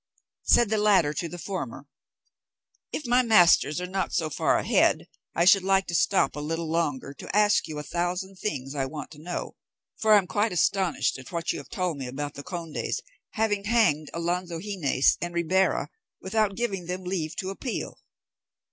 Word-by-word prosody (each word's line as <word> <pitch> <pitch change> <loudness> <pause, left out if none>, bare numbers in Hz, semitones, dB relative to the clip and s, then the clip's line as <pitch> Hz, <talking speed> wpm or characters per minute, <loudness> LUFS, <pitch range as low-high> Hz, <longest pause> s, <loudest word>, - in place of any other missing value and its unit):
Said 235 -3 +4
the 220 - +2
latter 195 -8 +4
to 165 +3 -3
the 175 - -7
former, 170 -8 -5 1.1
"If 300 - -4
my 245 +1 +4
masters 175 -8 +5
were 180 - -3
not 190 +1 -2
so 160 -3 0
far - - +2
ahead, - - +2 0.3
I 170 - +3
should 195 +1 +7
like 195 0 +2
to 175 - -6
stop 200 +1 +2
a - - -4
little 165 +2 -3
longer 145 -5 -1
to 165 - -7
ask 210 -1 +4
you 155 - -6
a 150 - -4
thousand 180 +4 -3
things 135 -10 -4
I 135 -2 -1
want 150 +2 -7
to 150 -1 -12
know, 175 +2 -5 0.4
for 220 -1 +3
I - - +9
am 195 - +2
quite 205 +4 0
astonished 175 -3 +1
at 130 - -11
what 170 -1 -1
you 165 - -5
have 140 - -12
told 180 -5 -2
me 130 - -4
about 145 +3 -5
the 140 - -8
conde's 165 0 -4 0.3
having 210 -2 0
hanged 210 -10 +2
Alonzo 170 0 -2
Gines 170 -9 +1
and 175 0 -4
Ribera 185 +3 +1 0.3
without 205 0 0
giving 195 -7 -3
them 180 +1 -4
leave 175 -4 -3
to 190 0 -3
appeal." 240 +5 -5
180 Hz, 185 wpm, -26 LUFS, 155-200 Hz, 1.1 s, I